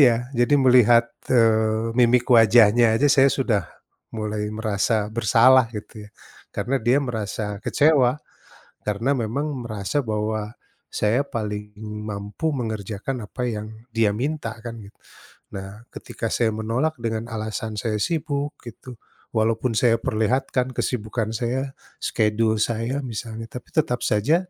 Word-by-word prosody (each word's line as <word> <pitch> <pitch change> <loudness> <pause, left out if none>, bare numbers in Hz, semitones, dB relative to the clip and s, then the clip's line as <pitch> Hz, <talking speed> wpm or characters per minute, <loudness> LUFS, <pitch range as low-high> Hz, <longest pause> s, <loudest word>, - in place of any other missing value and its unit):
Iya. 125 -4 +7 0.3
Jadi 120 +4 +4
melihat, 120 -2 +6 0.3
eee, 110 -1 +3
mimik 120 0 +4
wajahnya 115 +1 +6
aja 145 +5 +3
saya 135 0 +6
sudah 115 -8 +1 0.5
mulai 105 -1 -2
merasa 110 0 0 0.2
bersalah 115 +3 +5
gitu 105 - -9
ya. - - -29 0.4
Karena 135 +3 -1
dia 130 +4 +5
merasa 110 -2 -3 0.2
kecewa, 145 -5 +4 0.8
karena 105 +6 0
memang 120 +7 -2 0.2
merasa 110 +5 -2
bahwa 105 0 -1 0.6
saya 110 +5 +2
paling 105 -2 -3 0.5
mampu 100 +9 -5
mengerjakan 110 +2 -4
apa 125 +4 -6
yang 105 0 -5 0.3
dia 110 -2 +4
minta 145 -4 -2
kan 120 -1 -5
gitu. 100 - -17 0.6
Nah, 95 0 -6 0.2
ketika - - -6
saya 115 -2 +2
menolak 125 +9 0
dengan 110 0 -1
alasan 110 0 -4
saya 110 -3 -1
sibuk 145 -3 -2
gitu, 120 +2 -10 0.5
walaupun 115 +2 +1
saya 120 -2 +4
perlihatkan 125 +4 0
kesibukan 110 -2 -2
saya 125 +2 -1 0.4
skedul 110 0 +1
saya 115 +3 -2
misalnya, 115 0 -6
tapi - - -9
tetap 125 -5 +1
saja 110 +10 +3
115 Hz, 125 wpm, -23 LUFS, 110-125 Hz, 0.8 s, Iya